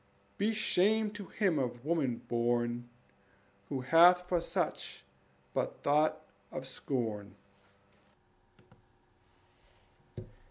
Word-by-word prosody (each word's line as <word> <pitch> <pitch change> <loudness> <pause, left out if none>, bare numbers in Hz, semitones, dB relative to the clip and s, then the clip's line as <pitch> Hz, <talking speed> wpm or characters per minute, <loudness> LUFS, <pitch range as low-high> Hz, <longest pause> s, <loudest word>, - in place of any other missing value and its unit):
Be 210 +3 +2
shame 215 0 +2
to 205 -3 -8
him 185 -7 +1
of 120 -1 -3
woman 150 -7 0
born 120 0 0 0.8
Who 135 - -2
hath 175 +6 +6
for 175 -2 +1
such - - -3 0.5
but - - -1
thought 150 +2 +2 0.3
of 130 - -5
scorn. 110 -8 -3
145 Hz, 85 wpm, -32 LUFS, 120-180 Hz, 0.8 s, hath